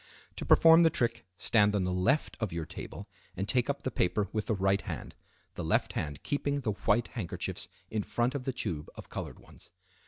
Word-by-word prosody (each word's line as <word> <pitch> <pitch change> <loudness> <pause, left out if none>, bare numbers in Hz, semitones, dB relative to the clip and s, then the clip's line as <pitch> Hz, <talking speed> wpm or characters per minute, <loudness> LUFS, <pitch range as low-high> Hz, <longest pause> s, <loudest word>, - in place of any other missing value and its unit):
To - - -4
perform 165 0 +8
the 165 - +6
trick 115 -7 -1
stand 105 +1 +3
on 100 - +1
the 90 0 0
left 95 +12 +1
of 110 -5 -2
your 85 -1 -3
table - - -8 0.3
and 100 +2 -2
take 125 +3 +2
up 140 0 -2
the 130 - -1
paper 100 0 +1
with 110 -1 -2
the 110 - +1
right 95 0 +2
hand, - - -6 0.4
the - - -5
left - - +1
hand 75 -2 -4
keeping 145 0 -1
the 115 -4 0
white 105 +3 +1
handkerchiefs 95 -8 -3 0.2
in 110 - 0
front 120 +5 0
of 140 -3 -4
the 135 - 0
tube 80 -11 -4
of - - -10
colored - - -6
ones. - - -16
110 Hz, 210 wpm, -30 LUFS, 95-130 Hz, 0.4 s, perform